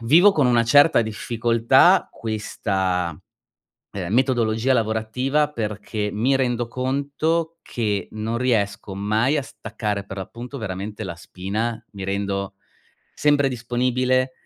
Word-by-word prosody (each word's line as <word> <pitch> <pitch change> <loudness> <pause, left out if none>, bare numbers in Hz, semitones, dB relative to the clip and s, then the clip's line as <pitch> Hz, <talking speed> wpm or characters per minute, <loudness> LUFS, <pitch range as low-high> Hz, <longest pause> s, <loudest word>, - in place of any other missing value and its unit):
vivo 170 - +6
con 145 -8 +2
una 120 -1 +3
certa 145 +4 +6
difficoltà 115 +1 +3
questa, 95 -6 -2 0.7
uhm, 95 -3 -4
metodologia 120 -1 +2
lavorativa 125 +6 0
perché, 105 -2 -3
mi 120 +6 +1
rendo 120 -3 0
conto 145 +6 -1
che 105 -5 -2
non 110 +2 -3
riesco 105 -5 0
mai 110 +8 +1
a 145 - 0
staccare, 110 -4 -4
per 100 - -8
l'appunto 120 +8 -7
veramente 105 +1 -5
la 85 -3 -6
spina, 105 +6 -4
mi 100 -2 -7
rendo 100 0 -2 0.6
sempre 145 -2 +3
disponibile, 125 +1 0
115 Hz, 115 wpm, -22 LUFS, 105-130 Hz, 0.7 s, vivo